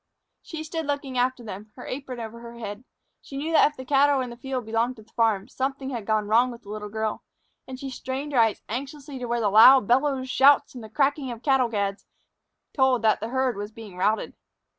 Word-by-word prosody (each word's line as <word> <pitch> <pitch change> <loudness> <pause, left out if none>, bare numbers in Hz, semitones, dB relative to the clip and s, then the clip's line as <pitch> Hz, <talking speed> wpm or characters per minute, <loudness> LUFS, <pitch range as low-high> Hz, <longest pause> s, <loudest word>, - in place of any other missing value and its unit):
She 315 -2 -7
stood 320 -1 -4
looking 280 -3 -2
after 250 0 0
them, 210 0 -8
her 250 - -10
apron 255 -2 -6
over 230 0 -7
her 235 0 -10
head. 210 +1 -7 0.4
She 275 - -9
knew 310 +4 -3
that 320 - +6
if 300 - -21
the 260 - -8
cattle 280 +1 +4
in 250 -2 -3
the - - -8
field 255 -1 -4
belonged 230 +3 0
to 220 - -14
the - - -29
farm, 220 -4 +1
something 270 0 -3
had 230 -5 -5
gone 215 -1 +1
wrong 235 +4 +4
with 240 -1 -10
the 200 - -14
little 210 0 -6
girl; 220 0 -3 0.4
and 260 -1 -8
she 270 -1 -6
strained 265 +3 -5
her 250 - +3
eyes 225 -2 +2
anxiously 275 +3 -6
to 250 - -4
where 235 -2 0
loud 225 +3 +7
bellows, 265 +1 +2
shouts, 275 +2 +4
and 245 -3 -9
the 220 - -10
cracking 280 +2 0
of 235 -1 -7
cattle 265 -4 +3
gads 200 -2 -2 0.7
told 265 -4 +2
that 215 -1 +3
the 220 - -4
herd 260 -1 0
was 205 +1 -5
being 215 -4 -11
routed. 210 +4 0
250 Hz, 225 wpm, -25 LUFS, 220-270 Hz, 0.7 s, loud